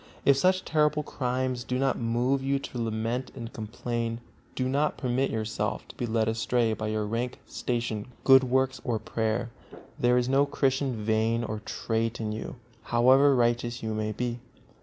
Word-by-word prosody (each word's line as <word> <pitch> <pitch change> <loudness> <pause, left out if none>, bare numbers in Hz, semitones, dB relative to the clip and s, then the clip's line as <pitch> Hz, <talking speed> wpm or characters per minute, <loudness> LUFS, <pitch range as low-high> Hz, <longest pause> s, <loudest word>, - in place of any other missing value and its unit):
If 140 - +6
such 185 +6 +2
terrible 150 -1 +2
crimes 125 -2 -2
do 125 0 -2
not 135 0 +2
move 120 +3 +1
you 135 +1 +1
to 125 -3 -5
lament 115 +3 -2
and 115 -3 -7
complain, 115 +1 -3 0.4
do 130 - 0
not 145 +3 +1
permit 130 +1 0
yourself 110 0 -2
to - - -11
be 120 - -3
led 110 -1 +1
astray 115 +1 +1
by 110 0 -3
your 110 0 -1
rank, 115 +4 -2
station, 115 -4 -3 0.2
good 135 -1 +7
works 130 +1 +1
or 120 -2 0
prayer: 110 +2 -2 0.5
there 125 0 +4
is 125 0 +1
no 135 +2 +3
Christian 135 -2 0
vein 110 +2 +1
or 110 -1 -3
trait 115 +1 -2
in 110 -1 -2
you, 110 +4 -5 0.3
however 130 +4 +5
righteous 120 0 +1
you 110 0 -2
may 110 0 -1
be. 120 +2 -3
120 Hz, 170 wpm, -28 LUFS, 110-130 Hz, 0.5 s, good